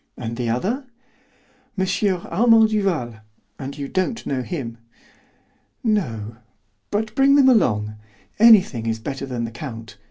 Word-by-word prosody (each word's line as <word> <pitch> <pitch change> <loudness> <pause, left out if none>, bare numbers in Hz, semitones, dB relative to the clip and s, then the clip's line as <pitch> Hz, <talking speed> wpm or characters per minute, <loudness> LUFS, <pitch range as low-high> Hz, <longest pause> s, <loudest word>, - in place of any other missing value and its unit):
And 115 -2 -5
the 120 -1 -2
other?" 220 - -2 0.9
"M. 190 - +1 0.4
Armand 225 +4 +4
Duval; 175 - -1 0.4
and 140 +1 -6
you 140 -1 -4
don't 185 - -2
know 130 -2 -2
him." 125 -6 -6 1.0
"No, 115 - -1 0.5
but 215 +1 -2
bring 275 +1 +4
them 280 -2 +6
along. 105 - +2 0.4
Anything 195 - +5
is 115 0 -1
better 135 +4 -5
than 125 -3 -3
the 115 - -6
count. 115 -3 -8
140 Hz, 130 wpm, -22 LUFS, -, 1.0 s, them